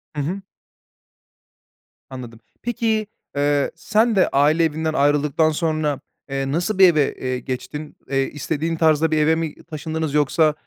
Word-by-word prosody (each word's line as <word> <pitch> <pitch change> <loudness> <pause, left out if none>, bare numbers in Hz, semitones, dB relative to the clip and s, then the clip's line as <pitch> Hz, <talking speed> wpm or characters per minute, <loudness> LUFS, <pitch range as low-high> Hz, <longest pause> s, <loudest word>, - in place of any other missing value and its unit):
Hı 145 - -1
hı. 180 +8 -3 1.7
Anladım, 120 -4 -9 0.2
peki, 225 -2 0 0.3
eee, 145 0 +1
sen 220 +2 +2
de 190 - +4
aile 150 +4 +3
evinden 160 0 0
ayrıldıktan 145 +2 +2
sonra, 155 -3 -1 0.3
eee, 135 0 -2
nasıl 175 +7 -1
bir 190 - +9
eve, 150 -2 +1
eee, 130 -1 -3
geçtin? 135 +4 -6
Eee, 135 0 +2
istediğin 160 +2 -2
tarzda 160 0 +3
bir 155 - +2
eve 155 +1 +4
mi 160 -2 -3
taşındınız 160 -1 -4
yoksa, 150 +1 +3
155 Hz, 140 wpm, -21 LUFS, 145-165 Hz, 1.7 s, bir